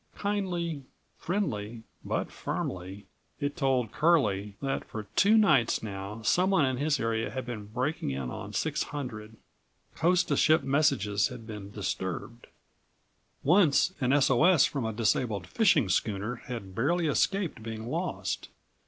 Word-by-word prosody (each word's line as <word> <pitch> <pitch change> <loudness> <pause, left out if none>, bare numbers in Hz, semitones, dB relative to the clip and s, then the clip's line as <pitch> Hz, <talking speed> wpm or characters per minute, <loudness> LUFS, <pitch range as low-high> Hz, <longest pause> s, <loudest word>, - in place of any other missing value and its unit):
Kindly, 180 -7 -2 0.4
friendly 115 - -3 0.2
but - - -2
firmly, 95 +2 -5 0.3
it 145 -1 -2
told 130 -8 +1
Curlie 105 - +2
that 135 -1 -2
for 110 - -7
two 215 +3 +5
nights 150 - +3
now 100 +1 -6
someone 180 - +3
in 130 -1 -1
his 145 +1 +1
area 115 0 -1
had 130 -1 -5
been 115 -4 -6
breaking 125 - -2
in 65 -2 -3
on - - -7
600. 110 -7 -3 0.6
Coast 175 +2 +2
to - - +2
ship 160 +1 +4
messages 130 -8 +2
had 125 -3 -9
been 105 -3 -8
disturbed. 100 +2 -4 1.0
Once 175 +1 +4
an 125 0 +2
S. 140 -1 +4
O. 130 +4 +4
S. 175 -4 +6
from 135 -5 -2
a 110 - -1
disabled 110 -1 0
fishing 190 - +3
schooner 105 +4 -1
had 115 -7 -6
barely 165 - +1
escaped 165 - 0
being 110 0 -6
lost. 170 +7 -3
125 Hz, 140 wpm, -29 LUFS, 105-160 Hz, 1.0 s, S